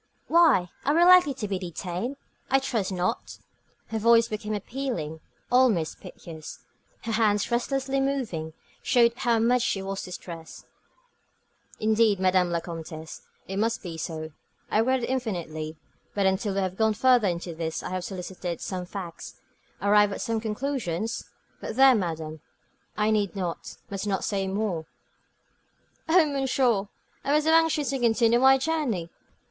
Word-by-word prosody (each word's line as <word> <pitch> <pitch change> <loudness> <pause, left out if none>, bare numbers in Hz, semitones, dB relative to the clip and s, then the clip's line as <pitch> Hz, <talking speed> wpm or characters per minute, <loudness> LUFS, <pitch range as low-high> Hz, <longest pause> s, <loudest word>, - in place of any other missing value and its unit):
"Why, 310 - +4
are 290 - +2
we 340 - +5
likely 360 -6 +7
to 220 -5 -4
be 195 -2 -2
detained? 180 - -4 0.3
I 270 - +5
trust 230 -7 -1
not." 185 +5 -2 0.5
Her 220 - -2
voice 230 +1 +5
became 215 0 -3
appealing, 205 - -4 0.3
almost 240 -11 +3
piteous. 160 -2 -10 0.5
Her 230 - -3
hands, 215 -1 +2
restlessly 270 +3 0
moving, 230 - -2 0.3
showed 235 -1 +4
how 240 -1 +1
much 240 +2 +3
she 230 -4 0
was 195 0 -4
distressed. 170 -2 -9 1.1
"Indeed, 215 -2 +3
Madame 185 -1 +3
la 170 -1 -1
Comtesse, 160 -1 -8 0.3
it 195 - -4
must 225 +2 0
be 170 -3 -6
so. 160 0 -5 0.4
I - - +3
regret 255 +2 +2
it - - -2
infinitely; 165 -11 -3 0.4
but 200 -1 +1
until 190 +1 +1
we 195 - +1
have 185 0 -3
gone 220 -1 +2
further 245 -2 +4
into 175 -1 -3
this, 160 0 -3
have 185 0 -4
elicited 180 -2 -5
some 180 -2 -4
facts, 180 -4 -7 0.5
arrived 205 0 +4
at - - -5
some 225 -1 -1
conclusions 225 -3 -3 0.3
But - - -6
there, 265 +1 +7
madame, 160 - -3 0.6
I 210 +1 +2
need 210 -2 0
not, 180 -4 -4
must 195 +1 -3
not 195 -2 -1
say 195 -2 -1
more." 190 -5 -2 1.2
"Oh, 340 0 +6
monsieur, 260 -7 +1 0.4
I 280 - +1
was 300 0 +3
so 320 - +3
anxious 320 -4 +3
to 270 - -2
continue 235 0 +3
my 265 +1 +6
journey. 260 - -1
210 Hz, 150 wpm, -26 LUFS, 180-250 Hz, 1.2 s, likely